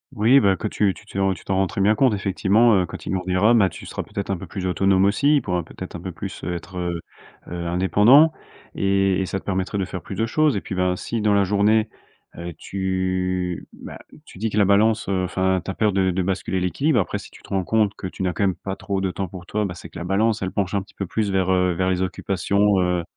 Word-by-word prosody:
Oui, 115 Hz, +6 st, +5 dB
ben 100 Hz, -6 st, +3 dB
que -, -, -3 dB
tu 105 Hz, -1 st, +1 dB
tu -, -, -15 dB
te -, -, -16 dB, 0.2 s
tu -, -, -15 dB
t'en 95 Hz, -, -1 dB
rends 95 Hz, 0 st, +2 dB
très 100 Hz, -, -3 dB
bien 105 Hz, +2 st, +4 dB
compte, 120 Hz, 0 st, +3 dB
effectivement, 100 Hz, +3 st, +3 dB
heu, 90 Hz, -, 0 dB
quand -, -, -9 dB
il -, -, -3 dB
grandira, 90 Hz, +3 st, +2 dB
heu, -, -, +6 dB
bah, 105 Hz, -5 st, +4 dB
tu -, -, -11 dB
seras -, -, -5 dB, 0.3 s
un 95 Hz, -, +1 dB
peu -, -, -9 dB
plus 95 Hz, -3 st, -5 dB
autonome 95 Hz, +1 st, +3 dB
aussi. 140 Hz, +9 st, +3 dB
Il 145 Hz, -, +3 dB
pourra 90 Hz, -2 st, -1 dB
peut-être -, -, -9 dB
un -, -, -5 dB
peu -, -, -5 dB
plus, -, -, -7 dB
heu, 90 Hz, -, -2 dB
être, 90 Hz, +2 st, -7 dB
heu 85 Hz, -1 st, -2 dB, 0.5 s
heu, 85 Hz, 0 st, -5 dB
indépendant 105 Hz, -, +5 dB, 0.4 s
et 95 Hz, -1 st, +1 dB
et 95 Hz, -, -2 dB
ça 95 Hz, -, -2 dB
te -, -, -21 dB
permettrait 95 Hz, +1 st, -2 dB
de 95 Hz, -, 0 dB
faire 90 Hz, -1 st, -6 dB
plus 100 Hz, -, -7 dB
de 110 Hz, -, 0 dB
choses. 150 Hz, +1 st, +2 dB
Et -, -, -3 dB
puis, -, -, -7 dB
ben, 90 Hz, 0 st, +1 dB
si 115 Hz, +4 st, -4 dB
dans 105 Hz, -1 st, +3 dB
la 100 Hz, -, +4 dB
journée, 105 Hz, +3 st, +2 dB, 0.5 s
heu, 85 Hz, +1 st, -6 dB
tu, 95 Hz, -2 st, -2 dB
bah, -, -, -10 dB, 0.3 s
tu -, -, -14 dB
dis 110 Hz, +1 st, -1 dB
que 105 Hz, -, -4 dB
la 105 Hz, -, +5 dB
balance, 110 Hz, +3 st, +3 dB
heu, 95 Hz, -1 st, 0 dB
enfin, 95 Hz, 0 st, 0 dB
tu 95 Hz, -, -7 dB
as 95 Hz, -, -3 dB
peur 110 Hz, -1 st, +2 dB
de 95 Hz, -1 st, +2 dB
de 90 Hz, 0 st, 0 dB
basculer 95 Hz, 0 st, -1 dB
l'équilibre, 115 Hz, -, +1 dB
après 95 Hz, -, -1 dB
si -, -, -12 dB
tu -, -, -17 dB
te -, -, -16 dB
rends 95 Hz, -1 st, 0 dB
compte 110 Hz, +1 st, +1 dB
que 95 Hz, -, -6 dB
tu 95 Hz, -, -6 dB
n'as 90 Hz, -, 0 dB
quand -, -, -4 dB
même 95 Hz, -2 st, +1 dB
pas 95 Hz, -, -5 dB
trop 100 Hz, -1 st, -3 dB
de 95 Hz, -1 st, -1 dB
temps 95 Hz, 0 st, -4 dB
pour 90 Hz, 0 st, -10 dB
toi, 105 Hz, +3 st, -1 dB
bah, 90 Hz, -3 st, -5 dB
c'est 85 Hz, -, -10 dB
que -, -, -9 dB
la 85 Hz, -, -5 dB
balance, 105 Hz, +4 st, +1 dB
elle 95 Hz, -1 st, -2 dB
penche 100 Hz, -1 st, -2 dB
un 100 Hz, -, +1 dB
petit 95 Hz, -, -17 dB
peu 100 Hz, -, -3 dB
plus 105 Hz, +3 st, -1 dB
vers, 95 Hz, -1 st, +1 dB
heu, 90 Hz, -1 st, +2 dB
vers 95 Hz, +2 st, 0 dB
les 90 Hz, 0 st, 0 dB
occupations, 100 Hz, +2 st, +1 dB
heu. 90 Hz, -1 st, 0 dB
95 Hz, 270 wpm, -22 LUFS, 90-105 Hz, 0.5 s, heu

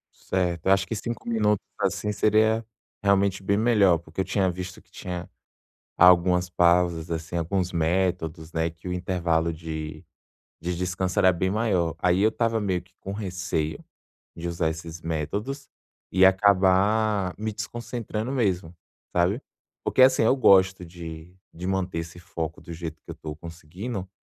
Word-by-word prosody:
Certo, 90 Hz, -3 st, -2 dB
eu -, -, +5 dB
acho 95 Hz, 0 st, +4 dB
que 115 Hz, -, -3 dB
5 115 Hz, +2 st, -5 dB
minutos, 105 Hz, -3 st, +1 dB, 0.2 s
assim, 100 Hz, +1 st, 0 dB
seria 110 Hz, +2 st, +3 dB, 0.4 s
realmente 100 Hz, -1 st, +2 dB
bem 100 Hz, +1 st, +1 dB
melhor, 105 Hz, -6 st, +4 dB
porque 85 Hz, +3 st, -5 dB
eu -, -, +1 dB
tinha 95 Hz, -2 st, +1 dB
visto 90 Hz, +1 st, -6 dB
que -, -, -33 dB
tinha 90 Hz, -2 st, -6 dB, 0.7 s
algumas 90 Hz, 0 st, +5 dB
pausas 85 Hz, -1 st, +2 dB
assim, 85 Hz, +1 st, -3 dB
alguns 90 Hz, +2 st, -1 dB
métodos, 85 Hz, -1 st, -1 dB
né, 80 Hz, 0 st, 0 dB
que 80 Hz, +2 st, -12 dB
o 90 Hz, -, -2 dB
intervalo 85 Hz, -2 st, 0 dB
de 80 Hz, -1 st, -6 dB, 0.6 s
de 90 Hz, +1 st, -2 dB
descanso 90 Hz, +1 st, -2 dB
era 95 Hz, -, +6 dB
bem 95 Hz, +2 st, -1 dB
maior, 95 Hz, -6 st, +1 dB
aí 90 Hz, +2 st, +2 dB
eu 105 Hz, -, +5 dB
estava 115 Hz, 0 st, 0 dB
meio 95 Hz, -4 st, -1 dB
que 90 Hz, -, -26 dB
com 95 Hz, -, -6 dB
receio, 90 Hz, -6 st, -3 dB, 0.6 s
de 85 Hz, -, -5 dB
usar 85 Hz, -1 st, 0 dB
esses 80 Hz, +1 st, -7 dB
métodos, 85 Hz, -, -3 dB, 0.4 s
e 95 Hz, +1 st, +5 dB
acabar 100 Hz, +1 st, +3 dB
me 110 Hz, +1 st, -3 dB
desconcentrando 115 Hz, +1 st, -4 dB
mesmo, 95 Hz, -10 st, 0 dB, 0.4 s
sabe? 90 Hz, +8 st, +1 dB, 0.4 s
Porque, -, -, +1 dB
assim, 130 Hz, -2 st, +6 dB
eu 115 Hz, -, +4 dB
gosto 95 Hz, -6 st, +5 dB
de 85 Hz, 0 st, -9 dB, 0.2 s
de 90 Hz, +2 st, -6 dB
manter 95 Hz, -2 st, -1 dB
esse 85 Hz, +1 st, -7 dB
foco 80 Hz, -2 st, -5 dB
do 85 Hz, -, -9 dB
jeito 80 Hz, -1 st, -7 dB
que -, -, -12 dB
eu -, -, -3 dB
estou 75 Hz, -1 st, -7 dB
conseguindo, 90 Hz, +6 st, -7 dB
90 Hz, 160 wpm, -25 LUFS, 85-100 Hz, 0.7 s, era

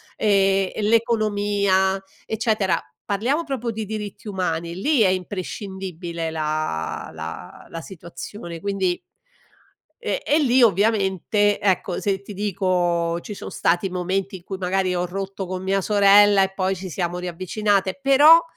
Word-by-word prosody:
e 195 Hz, -2 st, +2 dB
e -, -, -4 dB
l'economia, 205 Hz, -3 st, +2 dB, 0.2 s
eccetera. 215 Hz, -4 st, 0 dB, 0.2 s
Parliamo 245 Hz, +11 st, 0 dB
proprio 255 Hz, -6 st, -3 dB
di 220 Hz, 0 st, -4 dB
diritti 210 Hz, 0 st, -6 dB
umani, 170 Hz, -3 st, -2 dB
lì 275 Hz, -, +2 dB
è 200 Hz, -, +5 dB
imprescindibile 185 Hz, -3 st, -4 dB
la 155 Hz, -, -2 dB
la 80 Hz, +2 st, -8 dB
la 165 Hz, -, -7 dB
situazione 170 Hz, 0 st, -9 dB
quindi 190 Hz, -3 st, 0 dB, 1.1 s
e -, -, -1 dB
e 300 Hz, -, +3 dB
lì 260 Hz, -3 st, +4 dB
ovviamente 205 Hz, -1 st, +2 dB
ecco, 190 Hz, -2 st, 0 dB
se 195 Hz, -1 st, -1 dB
ti 205 Hz, -, -9 dB
dico 180 Hz, -4 st, 0 dB
ci 210 Hz, -, -7 dB
son -, -, -8 dB
stati 175 Hz, +3 st, +1 dB
momenti 185 Hz, +1 st, -2 dB
in 175 Hz, -, -18 dB
cui 190 Hz, -, -6 dB
magari 185 Hz, 0 st, 0 dB
ho 175 Hz, 0 st, 0 dB
rotto 195 Hz, +1 st, -5 dB
con 185 Hz, 0 st, -4 dB
mia 195 Hz, +1 st, +1 dB
sorella 205 Hz, 0 st, +6 dB
e 190 Hz, 0 st, +1 dB
poi 190 Hz, 0 st, 0 dB
ci 185 Hz, 0 st, -7 dB
siamo 175 Hz, 0 st, -2 dB
riavvicinate 190 Hz, +4 st, -1 dB
però, 290 Hz, +5 st, +7 dB
195 Hz, 140 wpm, -23 LUFS, 180-210 Hz, 1.1 s, però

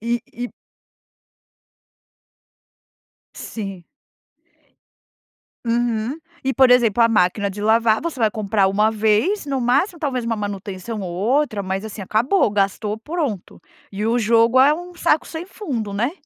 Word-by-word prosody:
E 235 Hz, +2 st, -1 dB
e 245 Hz, +1 st, -5 dB, 2.9 s
Sim. 195 Hz, -5 st, -7 dB, 1.8 s
Uhum 235 Hz, +2 st, 0 dB, 0.3 s
e, 270 Hz, -, 0 dB
por 260 Hz, -1 st, +5 dB
exemplo, 235 Hz, -2 st, +4 dB
a -, -, +6 dB
máquina 200 Hz, -1 st, +2 dB
de 200 Hz, +1 st, -7 dB
lavar, 220 Hz, +1 st, +3 dB
você 325 Hz, -5 st, -4 dB
vai 220 Hz, -2 st, +2 dB
comprar 205 Hz, -2 st, +1 dB
uma 210 Hz, +3 st, +2 dB
vez, 220 Hz, -, +1 dB
no 275 Hz, -2 st, -2 dB
máximo, 280 Hz, -, +1 dB
talvez 265 Hz, -5 st, -2 dB
uma 230 Hz, 0 st, -1 dB
manutenção 205 Hz, +1 st, -5 dB
ou 180 Hz, -2 st, -5 dB
outra, 220 Hz, +4 st, 0 dB
mas, 190 Hz, +1 st, -3 dB
assim, 220 Hz, -1 st, -7 dB
acabou. 230 Hz, -, +2 dB
Gastou, 205 Hz, +1 st, -1 dB
pronto. 280 Hz, -, -4 dB, 0.3 s
E 205 Hz, +2 st, -3 dB
o 230 Hz, +2 st, +2 dB
jogo 230 Hz, +2 st, +3 dB
é 280 Hz, +3 st, +6 dB
um 355 Hz, +2 st, -8 dB
saco 335 Hz, -3 st, +1 dB
sem 325 Hz, +1 st, -6 dB
fundo, 260 Hz, -, -5 dB
né? 225 Hz, +7 st, -1 dB
225 Hz, 135 wpm, -21 LUFS, 205-260 Hz, 2.9 s, a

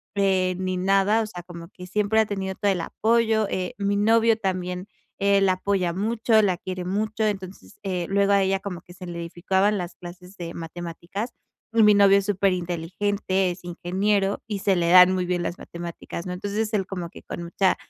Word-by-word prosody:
eh, 190 Hz, -2 st, +2 dB
ni 185 Hz, 0 st, -1 dB
nada. 195 Hz, +4 st, +3 dB
O -, -, -1 dB
sea, 180 Hz, -4 st, -8 dB
como 170 Hz, -1 st, -10 dB
que 180 Hz, 0 st, -11 dB
siempre 210 Hz, +3 st, +1 dB
ha 220 Hz, -, +4 dB
tenido 190 Hz, -2 st, -3 dB
todo 205 Hz, -, +1 dB
el 180 Hz, -3 st, -1 dB
apoyo. 220 Hz, +2 st, +1 dB
Eh, 185 Hz, -1 st, -2 dB
mi 200 Hz, 0 st, +1 dB
novio 225 Hz, +1 st, +4 dB
también, 180 Hz, -1 st, -3 dB, 0.3 s
eh, 200 Hz, 0 st, +3 dB
la 190 Hz, -1 st, +4 dB
apoya 185 Hz, -1 st, 0 dB
mucho, 220 Hz, +3 st, +2 dB
la 185 Hz, -3 st, +1 dB
quiere 185 Hz, 0 st, -5 dB
mucho. 215 Hz, +3 st, -1 dB
Entonces, 190 Hz, -, -5 dB
eh, 180 Hz, -3 st, -2 dB
luego 200 Hz, 0 st, +3 dB
a 200 Hz, -, +4 dB
ella 195 Hz, 0 st, +1 dB
como 190 Hz, -3 st, -6 dB
que 175 Hz, -, -15 dB
se 180 Hz, 0 st, -10 dB
le 175 Hz, -1 st, -6 dB
dificultaban 190 Hz, +4 st, 0 dB
las 175 Hz, 0 st, -5 dB
clases 180 Hz, +2 st, -11 dB
de 170 Hz, -1 st, -6 dB
matemáticas. 175 Hz, +6 st, -6 dB, 0.4 s
Y 230 Hz, -, +4 dB
mi 210 Hz, -1 st, +7 dB
novio 200 Hz, 0 st, +6 dB
es 195 Hz, -, -5 dB
súper 195 Hz, -1 st, +2 dB
inteligente, 185 Hz, +2 st, -1 dB
es 175 Hz, +1 st, -9 dB
ingeniero, 195 Hz, +3 st, 0 dB
y 210 Hz, -3 st, -3 dB
se 195 Hz, 0 st, +2 dB
le 170 Hz, -1 st, +1 dB
dan 180 Hz, 0 st, +8 dB
muy 185 Hz, -1 st, -1 dB
bien 180 Hz, 0 st, -1 dB
las 175 Hz, -, -3 dB
matemáticas, 170 Hz, 0 st, -7 dB
¿no? 180 Hz, -, -3 dB
Entonces 205 Hz, +4 st, -2 dB
él 195 Hz, -3 st, 0 dB
como 180 Hz, -4 st, -5 dB
que -, -, -14 dB
con -, -, -6 dB
mucha 185 Hz, +2 st, +1 dB
190 Hz, 205 wpm, -24 LUFS, 180-205 Hz, 0.4 s, dan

